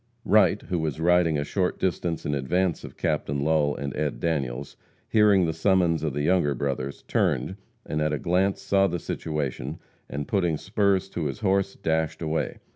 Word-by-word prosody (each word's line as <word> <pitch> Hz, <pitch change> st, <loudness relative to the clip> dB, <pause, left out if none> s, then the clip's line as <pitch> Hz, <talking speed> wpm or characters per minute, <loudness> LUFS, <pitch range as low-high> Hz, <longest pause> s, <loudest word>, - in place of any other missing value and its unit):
Wright, 105 Hz, 0 st, +4 dB
who 90 Hz, -3 st, -2 dB
was 80 Hz, -1 st, -2 dB
riding 85 Hz, -2 st, +3 dB
a 75 Hz, -, 0 dB
short 90 Hz, +4 st, -1 dB
distance 85 Hz, -2 st, -1 dB
in 75 Hz, -, -1 dB
advance 85 Hz, +6 st, 0 dB
of -, -, -10 dB
Captain 70 Hz, 0 st, -1 dB
Lull 75 Hz, -1 st, +2 dB
and 70 Hz, 0 st, -4 dB
Ed. 75 Hz, -1 st, -2 dB
Daniels, 70 Hz, -5 st, -2 dB, 0.3 s
hearing 105 Hz, -4 st, +4 dB
the 80 Hz, -, -1 dB
summons 85 Hz, -2 st, +2 dB
of 75 Hz, -3 st, -2 dB
the 75 Hz, +1 st, -1 dB
Younger 75 Hz, -4 st, +2 dB
Brothers, 70 Hz, +1 st, -3 dB
turned, 95 Hz, -, 0 dB, 0.3 s
and 75 Hz, -, -2 dB
at 75 Hz, 0 st, +1 dB
a 75 Hz, -, 0 dB
glance 95 Hz, +5 st, 0 dB
saw 100 Hz, 0 st, +3 dB
the 90 Hz, -1 st, -2 dB
situation, 75 Hz, -3 st, -4 dB, 0.3 s
and, 70 Hz, 0 st, -4 dB
putting 85 Hz, -6 st, +1 dB
spurs 100 Hz, +1 st, +1 dB
to 85 Hz, -4 st, -3 dB
his 70 Hz, -3 st, -4 dB
horse, 100 Hz, -1 st, +1 dB
dashed 80 Hz, -2 st, -1 dB
away. 80 Hz, 0 st, -2 dB
80 Hz, 180 wpm, -26 LUFS, 75-95 Hz, 0.3 s, Wright